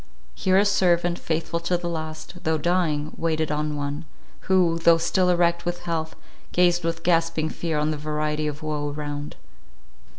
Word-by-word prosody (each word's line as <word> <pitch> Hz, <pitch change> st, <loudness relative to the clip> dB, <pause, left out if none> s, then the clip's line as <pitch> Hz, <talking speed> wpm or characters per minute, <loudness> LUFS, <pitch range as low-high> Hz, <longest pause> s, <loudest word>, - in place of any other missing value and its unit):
Here 185 Hz, -, +2 dB
a 200 Hz, -, +5 dB
servant, 175 Hz, -3 st, +2 dB
faithful 165 Hz, +1 st, -2 dB
to 175 Hz, +1 st, 0 dB
the 175 Hz, -, -5 dB
last, 160 Hz, +2 st, -6 dB
though 160 Hz, 0 st, +1 dB
dying, 155 Hz, -2 st, 0 dB
waited 160 Hz, -2 st, 0 dB
on 150 Hz, 0 st, -1 dB
one, 145 Hz, +2 st, -4 dB, 0.4 s
who, 175 Hz, -3 st, +3 dB
though 165 Hz, 0 st, +6 dB
still 180 Hz, +2 st, +2 dB
erect 170 Hz, -1 st, +2 dB
with 175 Hz, 0 st, -3 dB
health, 160 Hz, -1 st, -3 dB, 0.4 s
gazed 175 Hz, -1 st, +3 dB
with 165 Hz, 0 st, -2 dB
gasping 165 Hz, -2 st, +2 dB
fear 160 Hz, -1 st, -2 dB
on 150 Hz, +1 st, +1 dB
the 155 Hz, -, -3 dB
variety 150 Hz, 0 st, -1 dB
of 150 Hz, +1 st, -5 dB
woe 150 Hz, -1 st, -2 dB
around. 145 Hz, 0 st, -5 dB
165 Hz, 165 wpm, -24 LUFS, 150-175 Hz, 0.4 s, though